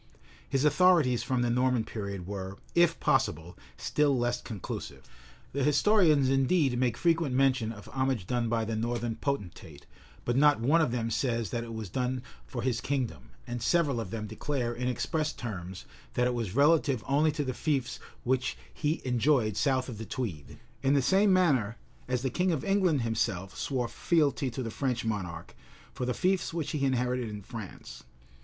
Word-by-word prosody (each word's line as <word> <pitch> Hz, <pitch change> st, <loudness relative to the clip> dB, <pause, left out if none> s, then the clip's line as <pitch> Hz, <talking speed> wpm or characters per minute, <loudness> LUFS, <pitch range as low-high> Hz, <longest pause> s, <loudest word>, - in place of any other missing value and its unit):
His 135 Hz, +1 st, +1 dB
authorities 150 Hz, -5 st, +4 dB
from 125 Hz, -2 st, 0 dB
the 120 Hz, -, +1 dB
Norman 125 Hz, -1 st, +2 dB
period 100 Hz, -5 st, -5 dB
were, 95 Hz, 0 st, -5 dB, 0.2 s
if 170 Hz, -1 st, +3 dB
possible, 90 Hz, -, 0 dB, 0.2 s
still 145 Hz, -3 st, +1 dB
less 120 Hz, 0 st, 0 dB
conclusive: 105 Hz, -5 st, -7 dB, 0.5 s
the 140 Hz, 0 st, 0 dB
historians 155 Hz, -2 st, +4 dB
indeed 135 Hz, +1 st, +2 dB
make 125 Hz, -3 st, +1 dB
frequent 165 Hz, -6 st, +1 dB
mention 130 Hz, -4 st, +2 dB
of 100 Hz, -2 st, -11 dB
homage 130 Hz, -6 st, -1 dB
done 120 Hz, +2 st, -1 dB
by 115 Hz, -1 st, 0 dB
the 110 Hz, 0 st, -2 dB
northern 120 Hz, 0 st, -2 dB
potentate; 90 Hz, -, -4 dB, 0.4 s
but 120 Hz, -, 0 dB
no 145 Hz, +2 st, +6 dB
one 140 Hz, +9 st, +3 dB
of 155 Hz, -, +2 dB
them 115 Hz, -1 st, -2 dB
says 115 Hz, -3 st, -1 dB
that 120 Hz, -1 st, -2 dB
it 115 Hz, -1 st, -7 dB
was 110 Hz, -2 st, -5 dB
done 125 Hz, +4 st, -2 dB, 0.2 s
for 120 Hz, -2 st, -5 dB
his 120 Hz, -2 st, 0 dB
kingdom; 125 Hz, -, -3 dB, 0.2 s
and 120 Hz, 0 st, -5 dB
several 145 Hz, -1 st, +2 dB
of 110 Hz, -5 st, -4 dB
them 110 Hz, +1 st, -4 dB
declare, 120 Hz, +3 st, -2 dB
in 125 Hz, +1 st, -3 dB
express 150 Hz, +4 st, -1 dB
terms 95 Hz, -5 st, -6 dB, 0.3 s
that 125 Hz, -, +2 dB
it 125 Hz, -, +1 dB
was 115 Hz, -5 st, -3 dB
relative 140 Hz, -4 st, +3 dB
only 150 Hz, +3 st, +3 dB
to 145 Hz, -, -1 dB
the 130 Hz, -2 st, -2 dB
fiefs 135 Hz, -2 st, -1 dB, 0.2 s
which 130 Hz, 0 st, 0 dB, 0.2 s
he 155 Hz, +2 st, -1 dB
enjoyed 125 Hz, -3 st, +2 dB
south 130 Hz, +1 st, +1 dB
of 115 Hz, -5 st, -7 dB
the 110 Hz, -, -5 dB
Tweed;[*] 95 Hz, -, -5 dB, 0.2 s
in 140 Hz, +1 st, +3 dB
the 140 Hz, -, +4 dB
same 195 Hz, +8 st, +4 dB
manner, 135 Hz, -, +3 dB, 0.3 s
as 125 Hz, 0 st, -1 dB
the 130 Hz, -, 0 dB
king 180 Hz, +6 st, +1 dB
of 155 Hz, -5 st, -2 dB
England 185 Hz, -9 st, +2 dB
himself 95 Hz, -4 st, -1 dB
swore 125 Hz, -4 st, -1 dB
fealty 145 Hz, -2 st, +1 dB
to 125 Hz, +2 st, -4 dB
the 115 Hz, -, -4 dB
French 125 Hz, -2 st, -2 dB
monarch, 90 Hz, -6 st, -4 dB, 0.4 s
for 125 Hz, -, -3 dB
the 125 Hz, -, +1 dB
fiefs 185 Hz, -2 st, 0 dB
which 165 Hz, -4 st, -2 dB
he 150 Hz, -3 st, -2 dB
inherited 125 Hz, -2 st, 0 dB
in 105 Hz, -1 st, -7 dB
France. 110 Hz, -1 st, -9 dB
125 Hz, 180 wpm, -29 LUFS, 115-140 Hz, 0.5 s, no